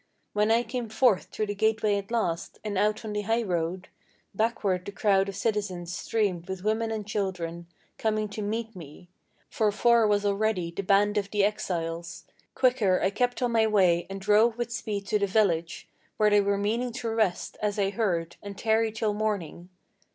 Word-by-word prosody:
When 210 +1 +2
I 230 +2 +4
came 240 0 -4
forth 220 -3 +3
through 215 - -3
the 205 - -3
gateway 215 0 +1
at 200 0 -4
last, 200 -8 -2
and 210 -2 -3
out 210 +3 +1
on 215 - -4
the 210 - -1
high 225 +3 0
road, 180 -1 -2 0.5
Backward 200 -4 0
the 200 - -6
crowd 200 -1 +2
of 195 - -6
citizens 195 -5 -2
streamed 190 -6 -1
with 190 -1 -5
women 220 +2 0
and 220 -2 -3
children, 180 -5 -3 0.3
Coming 215 -1 0
to 210 +1 -6
meet 220 +1 -3
me; 165 0 -12 0.4
for 215 -2 +1
far 235 +1 +4
was 205 0 +1
already 200 -4 0
the 170 - -4
band 205 +2 +3
of 200 -1 -5
the 205 -1 +1
exiles. 170 -5 -2 0.3
Quicker 240 -8 +3
I 190 - +1
kept 245 +4 0
on 245 - +1
my 225 -1 +3
way, 185 -5 +3
and 195 0 -5
drove 210 +4 +3
with 240 -1 -3
speed 210 -4 -3
to 210 +1 +1
the 200 - +1
village, 185 -5 0 0.3
Where 215 -1 +4
they 205 0 +5
were 200 0 +1
meaning 230 +5 -1
to 240 -2 -3
rest, 220 -5 -1
as 210 -1 -1
I 195 -1 +1
heard, 175 -6 -1
and 200 -1 -8
tarry 220 0 +2
till 220 -1 -1
morning. 200 -5 -3
205 Hz, 190 wpm, -27 LUFS, 190-220 Hz, 0.5 s, they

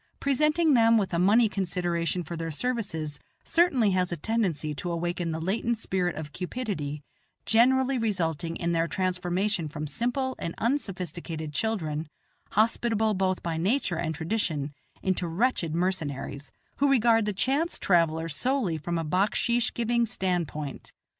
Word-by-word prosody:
Presenting 300 +3 +3
them 230 -2 +6
with 195 -4 0
a 170 - +1
money 215 +6 +5
consideration 175 -3 -1
for 170 - -6
their 165 0 -3
services 160 -6 -3 0.2
certainly 275 - +3
has 185 -1 +1
a 170 - -2
tendency 165 -6 -1
to 175 +4 -4
awaken 175 0 -2
the 160 0 -2
latent 220 +7 0
spirit 185 -5 -1
of 155 -1 -6
cupidity, 180 - -4 0.4
generally 260 +3 +4
resulting 165 -7 -1
in 170 0 -1
their 165 0 +1
transformation 180 0 -1
from 150 +1 -5
simple 245 - -1
and 170 - -4
unsophisticated 175 - -2
children, 160 -8 -1 0.5
hospitable 220 0 +2
both 185 -1 0
by 165 -2 -2
nature 190 +2 +1
and 160 -1 -2
tradition, 160 -5 -2 0.3
into 185 -2 0
wretched 170 -3 0
mercenaries, 145 -6 -2 0.3
who 285 +1 +3
regard 230 -4 +4
the 210 - 0
chance 270 - 0
traveller 165 -3 +2
solely 190 - 0
from 170 +3 -2
a 165 - -2
backsheesh 220 +8 +1
giving 235 0 +1
stand 185 -6 0
point. 145 -3 -7
185 Hz, 145 wpm, -27 LUFS, 165-230 Hz, 0.5 s, them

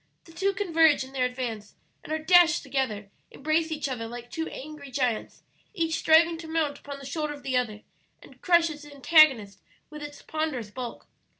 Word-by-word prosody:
The 330 - -15
two 390 +4 0
converge 330 -7 +3
in 265 +1 -12
their 255 -2 +1
advance, 240 -5 -6 0.3
and - - -9
are 315 - +1
dashed 345 +1 +5
together 240 -7 -3 0.2
embrace 315 +3 -1
each 300 -2 -2
other 240 -4 -4
like 240 +1 -9
two 325 0 -3
angry 285 0 -9
giants, 250 -4 -2 0.3
each 330 -3 0
striving 325 +1 +4
to 330 - -8
mount 320 -3 -1
upon 285 -1 -8
the 275 - -11
shoulder 300 +1 -3
of 285 -1 -12
the 265 -2 -2
other 220 -4 -1 0.4
and - - -18
crush 340 -2 +4
its 295 -1 -10
antagonist 280 - +4 0.3
with 300 0 -9
its 290 0 -9
ponderous 300 -9 -3
bulk. 245 +1 -7
290 Hz, 185 wpm, -27 LUFS, 250-320 Hz, 0.4 s, dashed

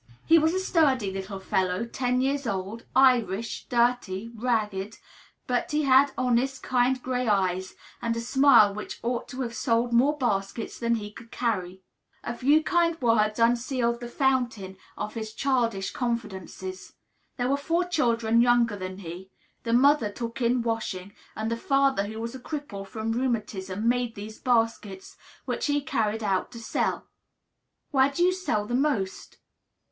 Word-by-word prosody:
He 330 0 +6
was 320 +3 +2
a - - +1
sturdy 275 - +2
little 195 +1 -6
fellow, 185 +2 0
ten 250 +1 -1
years 275 0 0
old, 200 +2 -4
Irish, 235 -5 +2
dirty, 235 -3 0
ragged; 215 -3 -2 0.5
but 245 -1 -1
he 300 0 0
had 275 +1 +5
honest, 255 +1 0
kind 255 +1 +2
gray 250 -1 -1
eyes, 185 -2 0 0.3
and 230 -1 -1
a - - -1
smile 240 -4 +5
which 210 +1 -7
ought 235 0 -2
to 255 - -6
have 235 -2 -3
sold 235 0 0
more 275 +6 +4
baskets 210 -4 -2
than 235 0 +1
he 210 -2 -5
could 230 +2 -13
carry. 190 -7 -2 0.4
A 235 - -3
few 290 +6 +3
kind 335 0 +1
words 215 -3 +2
unsealed 235 0 +1
the 240 - -6
fountain 240 -7 0 0.2
of 210 - -4
his 220 -2 -5
childish 235 -8 0
confidences. 190 -6 -5 0.4
There 245 - 0
were 275 - +2
four 330 +5 0
children 235 -9 +2
younger 240 -2 +3
than 185 -1 -6
he; 180 0 -8 0.3
the 230 - -3
mother 255 -1 +4
took 235 +2 -6
in 240 0 +2
washing, 205 -4 -3 0.2
and 220 +1 -3
the 230 - -1
father, 275 -4 +2
who 220 +1 -6
was 230 +1 -4
a 260 - -7
cripple 245 -8 -6
from 220 +2 -3
rheumatism, 215 -4 -2
made 245 -1 +1
these 215 +2 -8
baskets, 225 -5 -1 0.3
which - - -2
he 290 0 +2
carried 225 -7 -1
about 195 0 0
to 235 - -8
sell. 225 - -2 0.9
"Where 270 -1 +4
do 315 +5 0
you 365 +1 +4
sell 290 - -1
the 240 - -5
most?" 250 -8 -1
235 Hz, 160 wpm, -26 LUFS, 210-260 Hz, 0.9 s, He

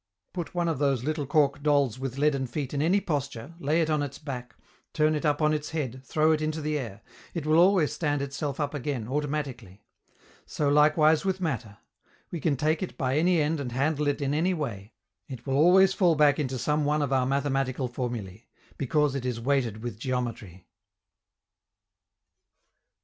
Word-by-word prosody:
Put 175 0 -5
one 175 -1 +1
of 160 -5 -1
those 135 -4 +1
little 150 -1 -2
cork 145 -1 +2
dolls 140 -5 +2
with 135 -1 -4
leaden 140 -2 +1
feet 135 +2 -4
in 140 - 0
any 175 +6 +3
posture, 140 - -4
lay 155 +2 +1
it 160 - -2
on 150 -1 +1
its 140 -2 -4
back, 125 -6 -7 0.4
turn 155 0 +2
it 150 0 0
up 150 +1 +1
on 155 0 +3
its 150 -1 -3
head, 130 -5 -4
throw 155 +4 +2
it 155 -1 +1
into 155 +1 -2
the 150 0 -2
air: 115 -7 -7 0.3
it 165 -3 -3
will 155 +1 +4
always 175 -5 +4
stand 145 -3 -1
itself 140 +1 -4
up 145 -1 -1
again, 135 -5 -3
automatically. 135 -8 -4 0.6
So 145 -2 0
likewise 155 +2 +4
with 190 -1 -1
matter: 125 - -3 0.5
we 170 - -4
can 145 -2 0
take 155 +4 +1
it 185 - -5
by 130 -3 0
any 175 +1 +3
end 155 +1 0
and 125 -4 -4
handle 145 +3 0
it 145 0 0
in 140 +1 0
any 175 +5 +1
way, 115 - -5 0.3
it 130 -4 -9
will 135 - -2
always 185 +6 +6
fall 180 -4 +3
back 145 -1 +4
into 130 -3 -2
some 150 +5 0
one 150 +1 +1
of 135 -1 -1
our 130 -1 +2
mathematical 135 -1 0
formulae, 120 -5 -5 0.3
because 150 +1 +1
it 135 -2 -3
is 125 -2 -2
weighted 120 -4 0
with 120 -3 -5
geometry. 120 -8 -4
145 Hz, 190 wpm, -27 LUFS, 130-155 Hz, 0.6 s, always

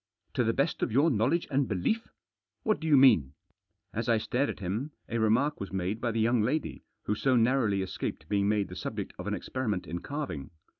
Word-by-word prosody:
— - - -46
to 125 - +2
the 115 - +2
best 140 +6 0
of - - 0
your 145 +8 +4
knowledge 130 +9 +1
and 135 -1 +2
belief? 110 - -1 0.3
— - - -58
what 215 -2 +1
do 160 - -4
you 150 -3 +6
mean? 105 - +6 0.3
" - - -49
As 115 +2 -2
I 115 - +5
stared 125 +5 0
at - - -5
him, 105 +11 -3
a 115 - -2
remark 120 +7 +2
was 100 - -5
made 95 +4 -2
by 120 - 0
the 115 0 -1
young 115 +1 +3
lady 140 +9 -1 0.2
who - - 0
so 130 +5 +2
narrowly 115 -5 +3
escaped 85 -4 -5
being 100 +1 +1
made 105 -2 +1
the - - -8
subject - - -5
of - - -5
an - - 0
experiment 110 -8 -3
in 85 +2 -4
carving. 140 - -5
115 Hz, 230 wpm, -29 LUFS, 105-135 Hz, 0.3 s, you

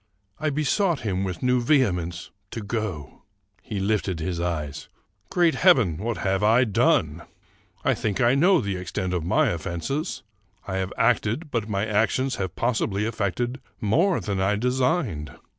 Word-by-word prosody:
I 155 0 0
besought 155 +3 +1
him 95 -3 -1
with 95 0 -4
new 125 0 +3
vehemence 90 - +1 0.2
to 115 - -5
go. 100 - -4 0.4
He 100 +3 -5
lifted 95 -3 0
his 85 +1 -3
eyes: 75 -5 -3 0.2
— 95 +2 -43
"Great 175 -4 +3
heaven! 125 - +4
what 115 +3 -2
have 95 0 0
I 115 +4 +5
done? 110 -6 +2 0.6
I - - +4
think 105 -2 -2
I 120 0 +4
know 175 +6 +4
the 100 -2 -2
extent 90 0 -3
of 90 -3 -1
my 90 +6 +2
offenses. 85 - -3 0.4
I 95 -1 -2
have 95 0 -2
acted, 125 +6 +1
but 115 -3 -2
my 100 0 0
actions 115 +5 +1
have 95 -3 -3
possibly 110 -4 0
effected 115 +4 -2 0.2
more 160 - +2
than 100 -1 -2
I 100 +2 +2
designed. 125 - -1
105 Hz, 160 wpm, -25 LUFS, 95-125 Hz, 0.6 s, I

